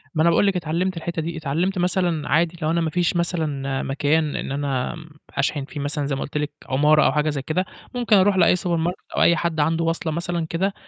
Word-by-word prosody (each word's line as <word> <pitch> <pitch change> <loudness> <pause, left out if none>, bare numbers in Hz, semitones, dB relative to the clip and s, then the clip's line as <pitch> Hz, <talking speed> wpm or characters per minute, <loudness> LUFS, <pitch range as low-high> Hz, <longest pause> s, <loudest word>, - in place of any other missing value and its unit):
ما 155 - +2
أنا 170 - +5
باقول 185 +4 +3
لِك 195 - +1
اتعلّمت 175 +2 -1
الحتّة 165 0 -3
دي، 165 +1 -4
اتعلّمت 165 +6 -1
مثلًا 175 -3 0
عادي 170 +2 +2
لو 155 - 0
أنا 170 - +1
ما 160 - 0
فيش 175 +2 0
مثلًا 150 -6 -1
مكان 145 +2 0
إن - - -4
أنا 140 0 -2
م 165 0 -12 0.3
أشحن 140 0 0
فيه 145 - -8
مثلًا 145 +1 -2
زي 140 -1 -1
ما 135 - -4
قُلت 145 - -4
لِك 150 0 -2
عُمارة 150 +3 +4
أو - - +4
حاجة 150 +2 +1
زي 145 -2 -2
كده، 160 +7 -1 0.3
ممكن 240 -3 +3
أروح 195 0 +4
لأي 180 -1 +5
سوبر 175 -1 -1
ماركت 170 +2 -2 0.2
أو - - +3
أي 170 - +5
حد 170 -2 -1
عنده 165 +3 +2
واصلة 165 0 -1
مثلًا 170 +1 -2
كده 190 +4 0
160 Hz, 235 wpm, -22 LUFS, 150-175 Hz, 0.3 s, أنا